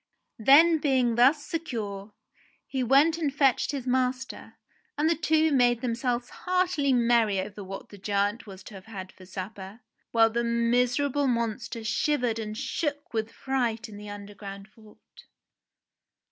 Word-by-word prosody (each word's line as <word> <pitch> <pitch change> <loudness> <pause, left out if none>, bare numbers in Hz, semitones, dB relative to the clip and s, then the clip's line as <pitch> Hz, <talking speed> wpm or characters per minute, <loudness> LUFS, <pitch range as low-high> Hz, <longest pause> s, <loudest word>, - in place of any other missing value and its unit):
Then 315 +8 +6
being 260 -5 +2
thus 270 +5 +4
secure, 215 -11 -5 0.5
he 265 - -3
went 280 +7 +4
and 300 -4 0
fetched 270 -2 +2
his 275 -4 -5
master, 255 0 -2 0.4
and 300 +2 +2
the 330 - +4
two 315 0 +2
made 245 -3 +3
themselves 245 0 -1
heartily 360 -6 0
merry 235 -5 +3
over 200 +1 -6
what 195 +1 -8
the 205 - -13
giant 205 +4 -1
was 190 -1 -11
to - - -12
have 195 -1 -11
had 190 -4 -8
for 185 - -16
supper, 195 +3 -8 0.3
while 225 -1 +4
the 235 +1 0
miserable 245 +4 +1
monster 230 -1 -2
shivered 235 +1 0
and 215 -1 -5
shook 290 +2 -3
with 220 0 -2
fright 240 -4 -2
in 215 - -11
the 205 0 -9
underground 200 0 -9
vault. 215 -1 -19
235 Hz, 145 wpm, -27 LUFS, 210-275 Hz, 0.5 s, Then